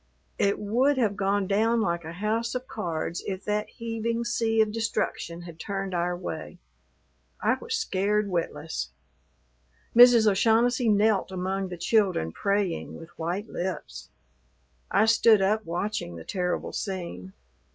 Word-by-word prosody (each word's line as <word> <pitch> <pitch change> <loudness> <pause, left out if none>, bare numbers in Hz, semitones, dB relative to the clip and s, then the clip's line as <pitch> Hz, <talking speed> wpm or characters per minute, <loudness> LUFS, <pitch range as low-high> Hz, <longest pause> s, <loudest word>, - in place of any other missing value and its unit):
It 200 0 +2
would 250 +7 +2
have 215 -5 +1
gone 200 0 +1
down 220 +4 +2
like 170 -6 0
a 160 +1 -7
house 220 +6 -1
of 250 0 -3
cards 170 -4 -3
if 190 -1 -4
that 210 0 -1
heaving 230 0 -3
sea 225 -2 0
of 215 -1 +4
destruction 220 -6 -2
had 170 -2 -11
turned 195 -1 -4
our 175 0 0
way. 180 - -6 0.8
I - - +2
was 460 -1 -2
scared 210 - 0
witless. 165 -4 -3 1.1
Mrs. 240 -2 +8
O'Shaughnessy 225 +4 +3
knelt 210 -2 +3
among 190 +1 -2
the 180 -1 -7
children 185 - +1
praying 200 - -1
with 165 0 -11
white 175 +5 -4
lips. 185 -4 -5 0.8
I 205 - +4
stood 225 -1 +5
up 210 +3 +1
watching 175 - -3
the 80 - -8
terrible 180 -1 -2
scene. 170 - -5
200 Hz, 140 wpm, -27 LUFS, 180-225 Hz, 1.1 s, Mrs